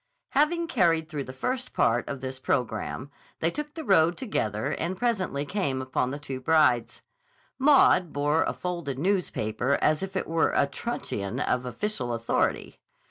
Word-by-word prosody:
Having 330 Hz, +4 st, +2 dB
carried 170 Hz, -, +2 dB
through 150 Hz, -4 st, -4 dB
the -, -, -7 dB
first 250 Hz, -, -3 dB
part 120 Hz, +2 st, +2 dB
of 140 Hz, -2 st, -5 dB
this 130 Hz, 0 st, -5 dB
programme, 125 Hz, +2 st, -2 dB, 0.3 s
they 165 Hz, -, +1 dB
took 300 Hz, +5 st, -5 dB
the 320 Hz, -, -5 dB
road 175 Hz, -, +4 dB
together 110 Hz, -, -1 dB
and 175 Hz, +3 st, -2 dB
presently 190 Hz, -11 st, -1 dB
came 140 Hz, -7 st, -1 dB
upon 130 Hz, -1 st, -1 dB
the 140 Hz, -, -4 dB
two 135 Hz, -3 st, -6 dB
brides. 130 Hz, -6 st, +2 dB, 0.6 s
Maud 260 Hz, -, +5 dB
bore 145 Hz, +2 st, +1 dB
a -, -, 0 dB
folded 170 Hz, -7 st, -4 dB
newspaper 140 Hz, -, 0 dB
as 155 Hz, 0 st, +2 dB
if 195 Hz, 0 st, -5 dB
it 190 Hz, -, -1 dB
were 165 Hz, 0 st, +1 dB
a -, -, +4 dB
truncheon 130 Hz, -, -4 dB
of 125 Hz, -3 st, 0 dB
official 125 Hz, -, -2 dB
authority. 115 Hz, 0 st, -1 dB
155 Hz, 160 wpm, -27 LUFS, 130-195 Hz, 0.6 s, Maud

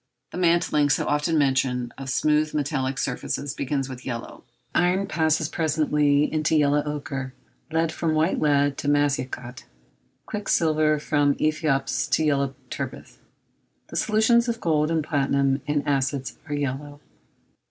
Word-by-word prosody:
The -, -, -7 dB
mantling, 165 Hz, -4 st, +2 dB
so -, -, +1 dB
often 150 Hz, +2 st, +1 dB
mentioned, 130 Hz, -3 st, +1 dB
of 135 Hz, -1 st, -7 dB
smooth 150 Hz, +3 st, +1 dB
metallic 135 Hz, -3 st, -1 dB
surfaces 140 Hz, +1 st, -3 dB
begins 135 Hz, -1 st, -2 dB
with 130 Hz, -2 st, -9 dB
yellow. 120 Hz, -3 st, -6 dB, 0.3 s
Iron 180 Hz, +3 st, +2 dB
passes 160 Hz, -2 st, +1 dB
presently 150 Hz, -3 st, +2 dB
into 155 Hz, 0 st, +1 dB
yellow 145 Hz, -1 st, +3 dB
ochre, 135 Hz, -3 st, -5 dB, 0.4 s
lead 160 Hz, 0 st, +1 dB
from 160 Hz, -1 st, -1 dB
white 160 Hz, +4 st, +1 dB
lead 145 Hz, -2 st, +2 dB
to -, -, -4 dB
massicot, 130 Hz, -4 st, -1 dB, 0.6 s
quicksilver 155 Hz, -7 st, +1 dB
from 145 Hz, -1 st, +1 dB
æthiops 155 Hz, -3 st, 0 dB
to 160 Hz, -, +3 dB
yellow 140 Hz, -2 st, +1 dB, 0.2 s
turbith. -, -, -6 dB, 0.7 s
The -, -, -9 dB
solutions 235 Hz, +2 st, +3 dB
of 230 Hz, 0 st, -2 dB
gold 155 Hz, -4 st, +1 dB
and 165 Hz, -2 st, 0 dB
platinum 140 Hz, -2 st, +1 dB
in 145 Hz, -1 st, -1 dB
acids 135 Hz, -1 st, -1 dB
are 145 Hz, -, -1 dB
yellow. 145 Hz, +1 st, -4 dB
145 Hz, 135 wpm, -24 LUFS, 140-155 Hz, 0.7 s, yellow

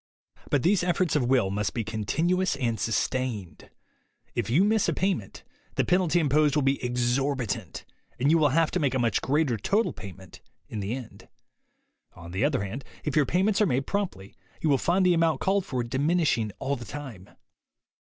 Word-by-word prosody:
But 140 Hz, -, +1 dB
these 185 Hz, +2 st, +3 dB
efforts 175 Hz, -1 st, +1 dB
of 140 Hz, -5 st, +2 dB
will 125 Hz, -8 st, +3 dB
must 100 Hz, -2 st, -2 dB
be 115 Hz, -, -1 dB
continu 115 Hz, -, 0 dB
ous 190 Hz, -, +1 dB
and 115 Hz, -3 st, -1 dB
sustained. 110 Hz, -5 st, -2 dB, 0.6 s
If 115 Hz, -3 st, -2 dB
you 150 Hz, +11 st, +4 dB
miss 215 Hz, -2 st, +2 dB
a -, -, +1 dB
payment, 180 Hz, -, -2 dB, 0.3 s
the -, -, +1 dB
penalty 175 Hz, -1 st, +2 dB
imposed 150 Hz, -1 st, +3 dB
will 150 Hz, -, +2 dB
be 135 Hz, 0 st, +1 dB
exorbitant, 125 Hz, +1 st, -1 dB, 0.3 s
and 140 Hz, +4 st, +3 dB
you 165 Hz, -, +4 dB
will 150 Hz, -2 st, +4 dB
have 165 Hz, +3 st, +2 dB
to 180 Hz, -, 0 dB
make 140 Hz, -4 st, 0 dB
a -, -, +3 dB
much 115 Hz, -5 st, +1 dB
greater 140 Hz, -4 st, +1 dB
total 205 Hz, -, +1 dB
payment 95 Hz, -2 st, -11 dB, 0.3 s
in 110 Hz, -, -5 dB
the 100 Hz, +4 st, -2 dB
end. 130 Hz, -4 st, -10 dB, 0.9 s
On 85 Hz, 0 st, -10 dB
the 95 Hz, +7 st, -1 dB
other 140 Hz, -7 st, +1 dB
hand, 115 Hz, +8 st, -5 dB, 0.2 s
if 150 Hz, -, -2 dB
your 150 Hz, -3 st, +3 dB
payments 195 Hz, +4 st, +2 dB
are 210 Hz, -, +4 dB
made 135 Hz, -2 st, 0 dB
promptly, 175 Hz, -, -3 dB, 0.3 s
you 160 Hz, -, 0 dB
will 135 Hz, -, +3 dB
find 185 Hz, +2 st, +2 dB
the 180 Hz, -, +5 dB
amount 165 Hz, -1 st, +2 dB
called 195 Hz, 0 st, 0 dB
for 125 Hz, -2 st, -2 dB
diminishing 135 Hz, -3 st, +1 dB
all 140 Hz, +1 st, -1 dB
the 120 Hz, -, -8 dB
time. 130 Hz, -11 st, -8 dB
135 Hz, 190 wpm, -27 LUFS, 115-165 Hz, 0.9 s, the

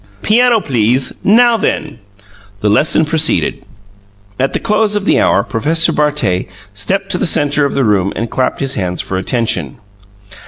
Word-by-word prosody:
Piano, 235 Hz, +1 st, +3 dB
please! 125 Hz, -, 0 dB
Now 235 Hz, +3 st, +4 dB
then!" 155 Hz, -8 st, -3 dB, 0.6 s
The 105 Hz, -, +1 dB
lesson 155 Hz, +8 st, +3 dB
proceeded. 160 Hz, 0 st, 0 dB, 0.8 s
At 135 Hz, +1 st, 0 dB
the -, -, -1 dB
close 210 Hz, -1 st, 0 dB
of 205 Hz, -1 st, -2 dB
the -, -, +2 dB
hour 100 Hz, -, +2 dB
Professor 165 Hz, +9 st, +1 dB
Bartet 150 Hz, -12 st, 0 dB, 0.3 s
stepped 195 Hz, -, -1 dB
to 180 Hz, -, +1 dB
the -, -, +1 dB
centre 145 Hz, -1 st, +2 dB
of 140 Hz, -, -3 dB
the 135 Hz, -, +1 dB
room 100 Hz, -4 st, +1 dB
and 115 Hz, -, -3 dB
clapped 130 Hz, +5 st, -2 dB
his 135 Hz, -1 st, -1 dB
hands 90 Hz, -8 st, -3 dB
for 95 Hz, -, -2 dB
attention. 95 Hz, -, -2 dB
145 Hz, 160 wpm, -14 LUFS, -, 0.8 s, Now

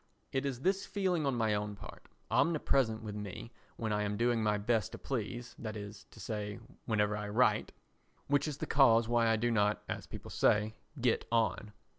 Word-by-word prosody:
It 135 Hz, +1 st, 0 dB
is 130 Hz, -2 st, -4 dB
this 195 Hz, +4 st, +1 dB
feeling 180 Hz, -7 st, 0 dB
on 135 Hz, -, +1 dB
my 110 Hz, -2 st, +1 dB
own 105 Hz, 0 st, -2 dB
part—omnipresent 135 Hz, -1 st, 0 dB
with 105 Hz, -1 st, -5 dB
me 105 Hz, +2 st, -6 dB, 0.2 s
when 110 Hz, -2 st, -2 dB
I 105 Hz, -, +1 dB
am 105 Hz, 0 st, -1 dB
doing 120 Hz, 0 st, +2 dB
my 105 Hz, -1 st, +2 dB
best 110 Hz, +1 st, 0 dB
to -, -, -5 dB
please, 120 Hz, -1 st, -4 dB
that 110 Hz, -2 st, -5 dB
is 100 Hz, 0 st, -8 dB
to -, -, -17 dB
say, 105 Hz, -2 st, -4 dB, 0.3 s
whenever 105 Hz, -2 st, +2 dB
I 105 Hz, 0 st, -4 dB
write—which 125 Hz, +5 st, -1 dB
is 145 Hz, -2 st, -4 dB
the -, -, -3 dB
cause 115 Hz, -5 st, +5 dB
why 120 Hz, -1 st, +3 dB
I 115 Hz, -, +4 dB
do 120 Hz, +2 st, +1 dB
not, 105 Hz, -2 st, +2 dB
as -, -, -4 dB
people -, -, -9 dB
say, 105 Hz, +1 st, +3 dB, 0.3 s
"get 120 Hz, -1 st, +2 dB
on." 110 Hz, -2 st, +1 dB
115 Hz, 185 wpm, -33 LUFS, 105-125 Hz, 0.3 s, cause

